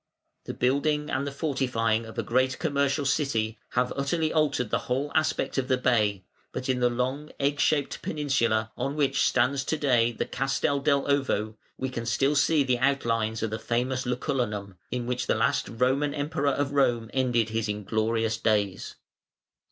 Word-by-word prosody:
The - - -5
building 150 +4 +1
and 140 +2 -1
the - - -3
fortifying 125 -6 0
of 110 - -11
a - - 0
great 130 +2 +1
commercial 140 -2 0
city 115 -6 0
have 125 0 +1
utterly 155 +3 0
altered 145 -7 +1
the - - +2
whole 135 +4 0
aspect 155 -3 +1
of 130 - -2
the 130 -1 +2
bay, 105 -7 +1 0.3
but 130 - -5
in 130 -1 +1
the 125 0 +3
long 130 +5 -2
egg 140 +1 0
shaped 145 -3 +1
peninsula, 115 -7 0
on 140 - -2
which 145 -3 +1
stands 135 +1 +2
to 160 - -1
day 120 -5 +3
the 115 - -3
Castel 135 +2 0
dell' 140 -1 +2
Ovo, 130 -7 0 0.2
we 130 - -2
can 120 -2 -5
still 135 +5 +2
see 145 +1 +3
the 125 -2 0
outlines 115 -5 0
of 110 - -1
the 110 - -3
famous 125 +3 -1
Lucullanum, 115 -5 -2 0.2
in 125 -1 -3
which 125 +1 -2
the - - +2
last 115 +1 +1
Roman 130 +5 +1
Emperor 145 -1 0
of 140 0 -1
Rome 120 -5 +1
ended 120 -4 +1
his 110 0 -2
inglorious 110 +2 0
days. 105 -4 0
130 Hz, 175 wpm, -27 LUFS, 115-140 Hz, 0.3 s, the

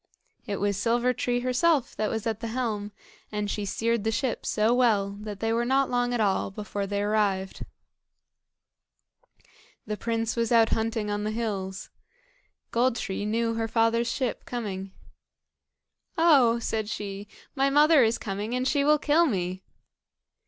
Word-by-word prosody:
It 205 - -2
was 200 -1 0
Silver 240 +4 +1
tree 245 0 -1
herself 255 +3 +1
that 215 -1 -1
was 225 -2 -3
at 220 -2 -1
the 230 - -4
helm, 220 -3 -3 0.4
and 210 -1 -2
she 210 - -3
steered 230 +2 -1
the 220 - +1
ship 245 +2 -2
so 220 +2 +2
well 220 -6 +2
that 210 -1 -7
they 225 0 +1
were 235 +1 +1
not 265 +2 +1
long 245 0 +1
at 245 - -1
all 195 -3 +1
before 200 0 -4
they 200 0 -1
arrived. 205 -2 0 2.2
The 210 0 -4
prince 230 0 -2
was 230 -1 0
out 230 -1 +5
hunting 220 -1 -1
on 205 0 -2
the 210 - -1
hills. 205 -4 -4 0.8
Gold 245 +1 +2
tree 205 -2 -3
knew 230 +1 0
her 225 0 -1
father's 230 +1 +1
ship 255 -4 -2
coming. 195 -5 -5 1.3
"Oh!" 280 -9 +5
said 220 -2 -2
she, 205 -1 -5 0.3
"my 275 -1 +2
mother 295 0 +6
is 225 +1 +2
coming, 205 +4 -4
and 255 +1 0
she 285 -1 +2
will 300 +1 +5
kill 310 +3 +3
me." 185 -5 -2
225 Hz, 160 wpm, -27 LUFS, 205-245 Hz, 2.2 s, mother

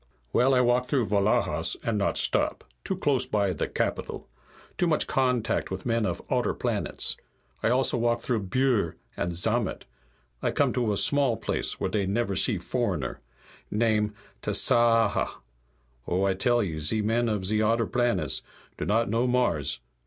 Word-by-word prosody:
"Well, 130 +2 +4
I 125 - +4
walk 125 +1 +2
through 130 -5 +1
Vlahas, 100 -6 +1
and 115 - -1
not 100 -1 0
stop. - - +1 0.2
Too - - -2
close 130 -3 +2
by 100 -5 +1
the 80 - -2
capital. - - -3 0.5
Too 175 - +1
much 155 -2 +2
contact 125 -3 0
with 95 -1 -6
men 115 -2 +1
of - - -4
odder - - 0
planets. - - -1 0.4
I - - +1
walk 120 - +3
also 120 -2 +2
through 115 -3 -2
Bhur 120 -5 +1 0.2
and 85 - -2
Zamat. 110 +4 -1 0.6
I - - +1
come - - +1
to 120 -4 0
a 100 - +1
small 140 -3 +3
place - - -2
where - - -2
dey 100 -3 0
never 100 0 -1
see - - +1
foreigner. 65 -2 -2 0.5
Name 105 -1 +1 0.3
Tasaaha. 115 -3 +3 0.7
Oh, 90 +2 0
I 100 -1 +2
tell 120 +5 +2
you, 80 -5 -4
ze 105 +9 0
men 115 +2 +1
of 105 -3 -2
ze 105 +2 +1
odder 115 +2 +2
planets 120 0 0 0.4
do - - -3
not 115 +3 +2
know 115 +4 +1
Mars. 75 - +1
115 Hz, 165 wpm, -27 LUFS, 100-120 Hz, 0.7 s, Well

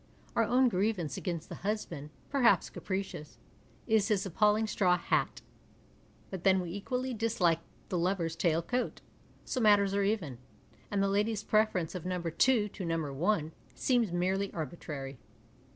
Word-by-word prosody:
Our 230 - +3
own 255 +3 +4
grievance 185 - 0
against 170 -3 -4
the - - -8
husband, 175 -7 -3 0.2
perhaps 265 -4 +3
capricious, 190 -6 -5 0.5
is 220 -3 +3
his 205 -3 +1
appalling 210 +4 +3
straw 185 -4 +2
hat - - -1 0.4
— - - -30
but 190 -3 -5
then 190 -1 +5
we 175 -2 -4
equally 250 +7 -3
dislike 205 -7 +1 0.3
the 180 - 0
lover's 170 -2 0
tail 165 0 +1
coat, 250 +6 -2 0.4
so 255 - -2
matters 205 -3 +5
are 200 - +2
even, 195 - -1 0.5
and 200 -1 +1
the - - +2
lady's 210 +2 0
preference 215 -7 +1
of 180 -3 -5
No. 180 -1 -1
2 210 +7 +2
to 195 - -7
No. 165 -4 -2
1 160 +1 0 0.2
seems 240 -7 +2
merely 190 +3 0
arbitrary. 150 -5 -6
195 Hz, 150 wpm, -31 LUFS, 170-215 Hz, 0.5 s, then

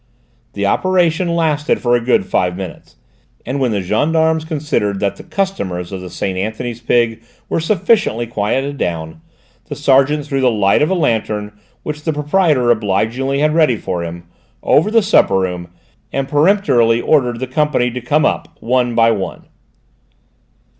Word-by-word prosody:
The 100 0 -2
operation 175 - +1
lasted 155 -3 0
for 120 -1 +2
a 120 - +1
good 120 -4 +1
five 90 -1 0
minutes, 95 -3 -9 0.5
and 130 +4 -3
when 130 -2 +1
the 100 -3 -1
gendarmes 160 - +1
considered 145 - -1
that 100 -1 -1
the - - -11
customers 100 - -3
of 95 -1 -5
the 90 - -8
Saint 95 +1 -3
Anthony's 110 +4 -4
Pig 115 -1 +1 0.3
were - - 0
sufficiently 185 - +1
quieted 125 +6 -2
down, 85 - -4 0.4
the 145 - -6
sergeant 145 +1 +2
threw 135 -2 -2
the 130 - +4
light 105 -1 +2
of 150 - +2
a 190 - +1
lantern, 110 - -1 0.3
which 150 0 -5
the 160 +1 -1
proprietor 150 -4 +2
obligingly 115 +6 0
had 150 0 +2
ready 155 -8 +3
for 90 -3 -4
him, 85 0 -7 0.4
over 160 +8 +3
the 225 0 +3
supper 195 - +3
room, 90 -2 -2 0.4
and 135 0 -2
peremptorily 145 - +3
ordered 125 -4 +1
the 130 - -2
company 130 -2 0
to 125 +1 -5
come 145 +5 +1
up, - - -2
one 125 0 0
by 115 0 +4
one. 95 -5 -4
125 Hz, 160 wpm, -17 LUFS, 105-150 Hz, 0.5 s, the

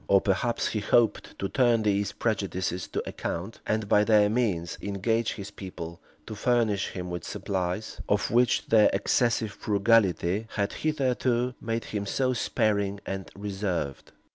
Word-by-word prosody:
Or, 100 - +6
perhaps, 100 +5 0
he 110 - -1
hoped 115 +1 +1
to 100 - -2
turn 120 -1 +3
these 100 -1 +1
prejudices 95 -5 -2
to - - -4
account; 95 +7 -4
and, 110 -1 0
by 105 +1 +4
their 105 -1 +4
means, 100 -9 -1
engage 110 +3 0
his 100 -3 -8
people 85 -4 -8 0.3
to - - -7
furnish 110 -3 +1
him 90 -1 -6
with 90 -2 -4
supplies, 95 +2 -3
of 105 0 +1
which 120 +2 +3
their 110 -2 +5
excessive 110 +2 +1
frugality 100 -1 +2
had 100 -1 0
hitherto 130 -4 0
made 115 0 -2
them 100 -2 -2
so 130 +4 +1
sparing 100 -3 0
and 95 -1 -5
reserved. 95 -8 -3
105 Hz, 145 wpm, -27 LUFS, 95-115 Hz, 0.3 s, Or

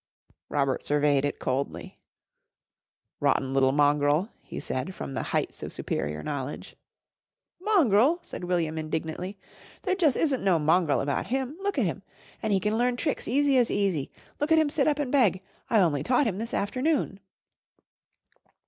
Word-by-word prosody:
Robert 140 -2 0
surveyed 145 -1 +2
it 145 - -2
coldly. 130 +2 -3 1.2
"Rotten 135 0 +1
little 135 -1 +4
mongrel!" 145 +5 +2
he - - -7
said 165 +9 -4
from 135 - -6
the - - -2
heights - - -2
of - - -5
superior 75 +1 -3
knowledge. 145 -1 -5 0.9
"Mongrel!" 310 - +4
said - - -8
William 165 -3 -1
indignantly. 160 +5 -4 0.5
"There 375 - +1
jus' 330 -8 +3
isn't 285 -5 0
no 190 -4 +4
mongrel 160 0 +2
about 140 0 -1
him. 265 +3 -2
Look 400 -4 -2
at 250 - +2
him! 185 +3 -3 0.4
An' 220 - -2
he 195 -2 +3
can 210 +3 0
learn 245 0 +2
tricks 295 +3 -2
easy 275 +2 +3
as 240 - +2
easy. 190 -9 0 0.3
Look 295 +2 -1
at 320 - +6
him 310 -2 +3
sit 285 -2 +2
up 295 -2 +2
and 285 -4 -2
beg. 210 -9 +3 0.3
I 225 - +4
only 160 -7 +2
taught 250 - +2
him 200 -4 -1
this 230 +1 -3
afternoon." 255 0 0
195 Hz, 160 wpm, -27 LUFS, -, 1.2 s, at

